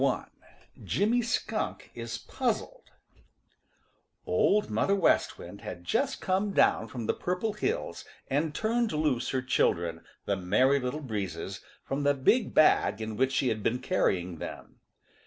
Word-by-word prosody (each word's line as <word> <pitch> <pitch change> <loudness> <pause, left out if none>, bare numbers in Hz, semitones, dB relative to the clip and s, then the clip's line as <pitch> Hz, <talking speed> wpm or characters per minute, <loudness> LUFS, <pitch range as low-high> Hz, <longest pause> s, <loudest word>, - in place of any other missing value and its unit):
TOAD - - +2 0.2
I - - -23 0.3
JIMMY 230 +4 +2
SKUNK 230 -1 -2
IS - - -5
PUZZLED - - -2 1.4
Old 210 - +2
Mother 115 - +2
West 195 - +2
Wind - - -10
had 90 -1 -7
just 270 - 0
come 195 +1 0
down 110 - +3
from 115 0 -6
the - - +1
Purple 185 +5 -2
Hills 440 - -2 0.2
and 150 +3 0
turned 230 +1 +1
loose 150 -6 0
her 130 -1 -1
children, 85 -10 +1 0.2
the 100 - +1
Merry 115 +10 +3
Little 130 +4 -3
Breezes, 100 -5 -4 0.2
from 135 +1 -2
the 145 0 +3
big 210 - +2
bag 150 -8 +4
in 110 -1 -4
which 130 +3 +2
she 130 -1 +2
had 110 -1 -2
been 115 +4 +1
carrying 90 - 0
them. - - -8
135 Hz, 150 wpm, -29 LUFS, -, 1.4 s, bag